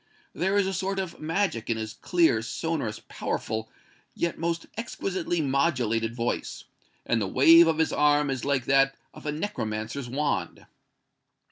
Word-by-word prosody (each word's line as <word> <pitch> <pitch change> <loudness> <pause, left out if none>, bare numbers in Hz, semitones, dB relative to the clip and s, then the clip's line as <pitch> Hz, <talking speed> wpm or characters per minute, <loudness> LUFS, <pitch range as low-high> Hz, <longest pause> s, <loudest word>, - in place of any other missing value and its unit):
There 190 +3 0
is 200 - +3
a 190 - -2
sort 195 +2 -2
of 190 -3 -4
magic 160 - -1
in 115 - +1
his 110 -1 -4
clear, 170 -11 +2
sonorous, 120 -2 -3
powerful, 110 0 -3 0.5
yet 170 -1 -2
most 170 0 -1
exquisitely 190 -6 -2
modulated 125 -6 +1
voice, 120 0 -3 0.4
and 115 -1 +1
the 100 - 0
wave 165 - +7
of 160 -1 +2
his 160 - +1
arm 145 -1 +3
is 130 -3 -3
like 140 -3 0
that 135 0 +3 0.2
of - - -10
a - - +1
necromancer's 120 - -4
wand." 145 +4 -2
145 Hz, 150 wpm, -27 LUFS, 115-170 Hz, 0.5 s, wave